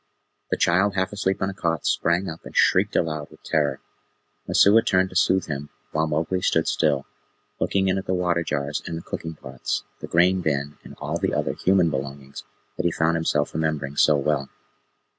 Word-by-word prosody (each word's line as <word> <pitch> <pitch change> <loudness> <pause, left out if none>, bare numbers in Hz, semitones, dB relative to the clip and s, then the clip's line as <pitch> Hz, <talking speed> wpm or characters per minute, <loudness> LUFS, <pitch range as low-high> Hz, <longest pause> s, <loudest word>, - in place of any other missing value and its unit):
The - - 0
child 95 +3 +2
half 95 +1 -1
asleep 95 -2 -1
on 95 - 0
a - - -10
cot 85 -4 -2
sprang 85 +3 +1
up 80 0 -7
and - - -9
shrieked - - +3
aloud 75 -2 0
with - - -18
terror. 70 -3 0 0.7
Messua 105 +3 +6
turned 95 0 +2
to - - -12
soothe 95 -1 +3
him, 75 -1 -5 0.2
while 80 +1 0
Mowgli 80 +4 -1
stood 80 -3 +1
still, 70 -4 +1 0.5
looking 95 -1 +1
in 95 0 +1
at 95 - -9
the 95 - +1
water 90 -1 +1
jars 75 -2 -2
and 85 - -4
the 85 - -8
cooking 80 0 -6
pots, 65 -3 -4 0.2
the - - -7
grain 90 +2 +3
bin, 75 -2 -2
and - - -12
all - - -3
the - - 0
other - - 0
human 90 -3 +2
belongings 70 0 -6 0.3
that 90 - -2
he - - +1
found 80 +1 +1
himself 75 -3 0
remembering 75 -3 -2
so 75 - +5
well. 70 -1 -1
80 Hz, 195 wpm, -24 LUFS, 75-95 Hz, 0.7 s, Messua